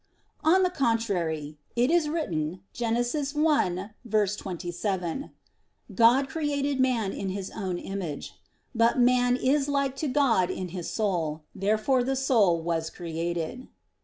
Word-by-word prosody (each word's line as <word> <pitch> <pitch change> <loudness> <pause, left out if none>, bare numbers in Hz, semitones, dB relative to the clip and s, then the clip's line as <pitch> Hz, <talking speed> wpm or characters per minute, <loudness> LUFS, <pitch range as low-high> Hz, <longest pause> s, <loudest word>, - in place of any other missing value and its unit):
On 360 +5 +5
the 365 - +2
contrary, 180 - -1 0.2
It 245 +4 +3
is 335 -3 +3
written 180 - -2
(Gen. 230 -1 -1
1:27): 210 - -1 0.6
"God 245 +4 +5
created 285 -2 -1
man 240 -6 +2
to - - -7
His 190 0 -4
own 190 -4 -3
image." 180 -6 -5 0.4
But 230 +1 +3
man 245 0 +4
is 275 +3 +1
like 275 -2 0
to 305 - -1
God 250 -10 +3
in 185 -1 -4
his 175 -1 -5
soul. 165 -8 -1
Therefore 215 +6 +1
the 270 +2 0
soul 225 -10 +3
was 165 -1 -1
created. 170 +8 -4
225 Hz, 125 wpm, -27 LUFS, 180-270 Hz, 0.6 s, On